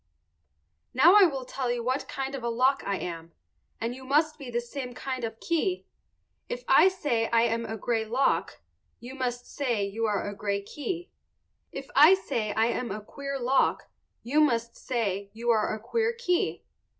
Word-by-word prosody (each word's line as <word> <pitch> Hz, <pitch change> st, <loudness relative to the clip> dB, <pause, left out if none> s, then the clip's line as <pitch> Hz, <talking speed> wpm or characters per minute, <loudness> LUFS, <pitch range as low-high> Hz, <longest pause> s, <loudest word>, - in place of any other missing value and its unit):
Now 310 Hz, +8 st, +7 dB
I 410 Hz, -2 st, +9 dB
will 270 Hz, -5 st, -5 dB
tell 255 Hz, -1 st, -3 dB
you 240 Hz, -1 st, -2 dB
what 255 Hz, +3 st, -1 dB
kind 270 Hz, 0 st, -4 dB
of 270 Hz, -, -4 dB
a 235 Hz, -, -1 dB
lock 255 Hz, +4 st, +2 dB
I 200 Hz, -, -1 dB
am, 165 Hz, -2 st, -6 dB, 0.5 s
and 230 Hz, +1 st, -2 dB
you 260 Hz, +1 st, -11 dB
must 305 Hz, +4 st, +1 dB
be 270 Hz, -3 st, -7 dB
the 240 Hz, 0 st, -1 dB
same 245 Hz, +1 st, -6 dB
kind 260 Hz, -2 st, -4 dB
of 225 Hz, -, -2 dB
a -, -, -29 dB
key. 340 Hz, -, -1 dB, 0.6 s
If -, -, -4 dB
I -, -, +7 dB
say 285 Hz, -12 st, 0 dB
I 230 Hz, 0 st, +4 dB
am 230 Hz, 0 st, 0 dB
a 220 Hz, -, -4 dB
gray 225 Hz, +1 st, 0 dB
lock, 245 Hz, +5 st, 0 dB, 0.4 s
you 245 Hz, +2 st, -9 dB
must 245 Hz, -2 st, -3 dB
say 240 Hz, -8 st, -1 dB
you 220 Hz, +3 st, -2 dB
are 205 Hz, -1 st, -1 dB
a 205 Hz, -, -4 dB
gray 200 Hz, -1 st, -2 dB
key. 340 Hz, -, -5 dB, 0.6 s
If 270 Hz, -, -7 dB
I 305 Hz, +7 st, +8 dB
say 235 Hz, -, -3 dB
I 220 Hz, -, +3 dB
am 240 Hz, +1 st, -1 dB
a 210 Hz, -, -4 dB
queer 275 Hz, +2 st, -5 dB
lock 260 Hz, +2 st, +1 dB, 0.3 s
you 285 Hz, +6 st, +2 dB
must 235 Hz, -5 st, +1 dB
say 200 Hz, -6 st, -2 dB
you 235 Hz, +2 st, 0 dB
are 215 Hz, -2 st, +2 dB
a 215 Hz, -, -3 dB
queer 455 Hz, -, 0 dB
key. 360 Hz, -7 st, -1 dB
245 Hz, 190 wpm, -27 LUFS, 225-280 Hz, 0.6 s, I